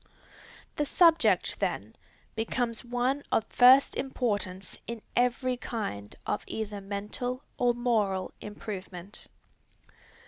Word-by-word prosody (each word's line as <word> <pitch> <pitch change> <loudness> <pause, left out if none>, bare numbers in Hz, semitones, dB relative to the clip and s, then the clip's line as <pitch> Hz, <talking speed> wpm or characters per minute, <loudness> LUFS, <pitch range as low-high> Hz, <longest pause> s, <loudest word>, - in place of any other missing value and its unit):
The 295 - +1
subject, 335 0 +4
then, - - -2 0.4
becomes 230 +1 -1
one 245 +3 0
of 225 - +2
first 255 +2 +7
importance 205 -8 -2
in 230 -2 -6
every 250 +1 +2
kind 200 - -5
of - - -1
either 210 -2 -4
mental 210 +6 -4 0.2
or 245 -1 +3
moral 210 -6 0
improvement. 200 -2 -7
230 Hz, 100 wpm, -29 LUFS, 200-250 Hz, 0.4 s, first